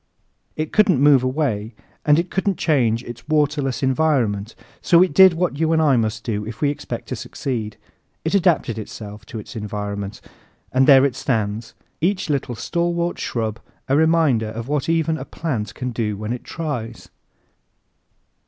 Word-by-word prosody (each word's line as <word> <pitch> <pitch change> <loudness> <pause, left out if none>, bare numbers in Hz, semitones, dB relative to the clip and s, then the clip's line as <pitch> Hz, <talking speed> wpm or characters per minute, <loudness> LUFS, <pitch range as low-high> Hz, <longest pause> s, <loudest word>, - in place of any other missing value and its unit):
It 155 0 -4
couldn't 205 - +4
move 140 -2 +5
away 125 -6 -1 0.3
and 150 0 +5
it 170 +2 -1
couldn't 195 -1 0
change 120 -7 +1
its 120 +1 -10
waterless 145 -4 +1
environment, 130 -7 +1 0.3
so 170 0 +5
it 185 - -1
did 190 +2 +8
what 165 -4 -1
you 160 0 +2
and 160 - +3
I 150 -4 +4
must 110 -1 -1
do 105 -3 -2
if 110 +2 -7
we 145 -1 +2
expect 145 - -6
to - - -2
succeed. 115 -6 -4 0.5
It 160 - -1
adapted 170 - +2
itself 105 0 -9
to - - -7
its 110 - -9
environment, 105 -1 -4 0.5
and 130 +1 +4
there 135 -2 +8
it 135 -3 -1
stands, 110 -4 -2 0.3
each 185 -1 0
little 135 -3 -2
stalwart 170 +5 -1
shrub 110 -1 -2 0.3
a 135 - +2
reminder 155 -8 +3
of 115 +2 -6
what 145 +1 -1
even 160 -1 +1
a - - -5
plant 115 -11 -4
can 125 0 -4
do 110 -3 -2
when 110 +3 -3
it 125 - -6
tries! 125 -9 -5
130 Hz, 165 wpm, -21 LUFS, 110-160 Hz, 0.5 s, did